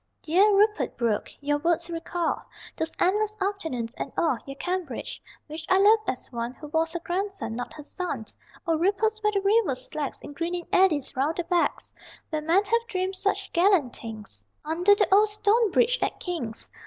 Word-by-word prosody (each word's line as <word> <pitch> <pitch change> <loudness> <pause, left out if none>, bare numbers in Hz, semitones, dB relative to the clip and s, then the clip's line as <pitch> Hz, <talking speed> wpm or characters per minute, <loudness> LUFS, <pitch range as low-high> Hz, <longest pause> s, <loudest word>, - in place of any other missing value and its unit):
Dear 375 +7 +4
Rupert 420 +1 +2
Brooke, 230 -3 0
your 290 +1 0
words 340 +2 +1
recall 335 0 -2 0.3
Those 320 0 -2
endless 420 +3 +2
afternoons, 320 - -2
and - - -4
all 305 -8 +2
Your 275 - -6
Cambridge 355 -2 -4 0.2
which 310 +1 -7
I 375 - +5
loved 430 +3 +5
as 255 - -4
one 235 +1 -4
Who 300 - -10
was 325 +1 0
her 345 - -2
grandson, 370 - -3
not 245 +1 -5
her 300 - -9
son. 290 - -4 0.4
O 330 -1 +2
ripples 420 +4 +1
where 425 0 +2
the 400 -1 0
river 400 - +3
slacks 275 +2 -5
In - - -8
greening 345 +3 -3
eddies 335 -7 +3
round 285 +5 0
the 350 - 0
"backs"; 345 0 0 0.4
Where 310 -1 -1
men 335 +6 +3
have 465 +3 +1
dreamed 375 -1 -2
such 400 +1 -1
gallant 345 -8 +3
things 220 -3 -9 0.2
Under 350 +6 +4
the 405 - +2
old 420 +2 +6
stone 425 +2 +2
bridge - - +3
at - - -1
King's. 280 -12 -3
345 Hz, 180 wpm, -26 LUFS, 295-400 Hz, 0.4 s, old